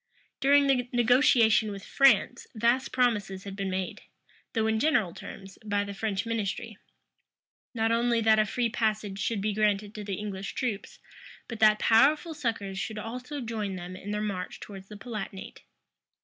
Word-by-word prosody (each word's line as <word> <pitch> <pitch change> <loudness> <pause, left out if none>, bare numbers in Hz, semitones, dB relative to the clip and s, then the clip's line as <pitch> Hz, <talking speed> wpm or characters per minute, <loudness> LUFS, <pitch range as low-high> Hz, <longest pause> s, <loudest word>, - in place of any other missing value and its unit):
During 280 +1 +5
the 250 -3 +1
negotiation 240 -3 +4
with 200 -2 -7
France, 275 -1 +3
vast 235 +4 +1
promises 205 -7 0
had 195 -1 -7
been 195 -1 -3
made, 185 0 -3 0.5
though 225 -2 +1
in 220 0 +1
general 240 - +2
terms, 195 -1 -10
by 205 -1 0
the 200 0 -6
French 200 0 -2
ministry; 225 -1 -3 1.0
not 225 0 +1
only 235 0 +2
that 220 -1 +4
a 215 - +3
free 245 +1 0
passage 215 -3 -1
should 205 +1 -1
be 210 +1 0
granted 210 0 +1
to 210 - -7
the 200 -1 -3
English 195 -1 -5
troops, 230 -6 -3 0.5
but 230 -2 -7
that 215 -1 +6
powerful 295 +10 +4
succors 225 -9 -3
should 220 +2 -4
also 250 +6 -6
join 215 -4 -3
them 180 0 -7
in 195 +2 -9
their 210 0 -2
march 190 -3 -4
towards 195 -2 -10
the 210 - -10
Palatinate. 200 -3 -7
215 Hz, 165 wpm, -28 LUFS, 200-235 Hz, 1.0 s, that